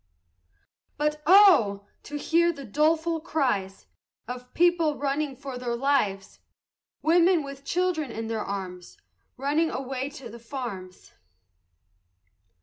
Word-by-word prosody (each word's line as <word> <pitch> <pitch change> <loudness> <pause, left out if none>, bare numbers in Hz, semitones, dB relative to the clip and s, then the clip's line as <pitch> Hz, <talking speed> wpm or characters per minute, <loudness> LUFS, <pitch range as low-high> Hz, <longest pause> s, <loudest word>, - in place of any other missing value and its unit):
But 300 +1 -1
oh! 295 - +6 0.2
to 295 - -5
hear 340 +3 +2
the 280 -4 -9
doleful 320 +6 +1
cries 245 - -1 0.4
Of 250 +1 -8
people 335 -3 +3
running 280 0 -2
for 270 -2 -7
their 240 -1 -2
lives! 235 -7 0 0.6
Women, 340 0 +4
with 275 0 -9
children 345 -4 -1
in 225 0 -5
their 225 -1 -3
arms, 185 -3 -6 0.4
Running 295 +5 +1
away 265 0 -4
to 270 -3 -10
the 235 +1 -11
farms! 230 -7 -7
275 Hz, 115 wpm, -26 LUFS, 230-315 Hz, 0.6 s, oh